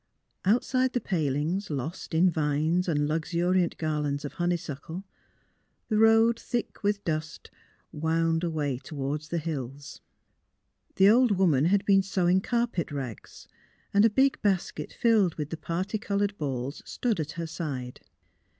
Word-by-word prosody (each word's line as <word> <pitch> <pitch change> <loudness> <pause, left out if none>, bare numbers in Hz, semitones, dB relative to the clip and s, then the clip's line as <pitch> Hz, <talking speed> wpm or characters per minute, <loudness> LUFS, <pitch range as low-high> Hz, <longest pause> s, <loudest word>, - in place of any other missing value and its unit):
Outside 255 +5 +2
the 245 - +1
palings, 165 - -1
lost 155 +4 -4
in 175 +3 +5
vines 155 +3 +1
and 145 -3 +1
luxuriant 170 +3 0
garlands 150 -2 -1
of 145 - -6
honeysuckle, 175 0 -3 0.9
the 215 -2 +2
road 225 +1 +5
thick 240 -1 -4
with 205 -1 0
dust 155 -2 -4 0.4
wound 165 +1 0
away 150 -6 -1
toward 145 +1 -4
the 160 +2 -4
hills. 140 -4 -5 0.9
The 190 - +6
old 230 -1 +5
woman 160 -7 +3
had 200 +3 +2
been 195 -1 +5
sewing 190 -1 +2
carpet 235 -8 -1
rags 130 -7 -7 0.5
and 200 +1 +5
a 225 - +6
big 270 +5 +2
basket 195 -4 -1
filled 215 -7 +2
with 150 -1 -5
the 165 - -3
parti 185 +7 -3
coloured 205 -1 -1
balls 135 -1 -3
stood 230 -7 -2
at 150 -1 -3
her 165 0 -4
side. 145 -7 -5
170 Hz, 140 wpm, -27 LUFS, 150-200 Hz, 0.9 s, The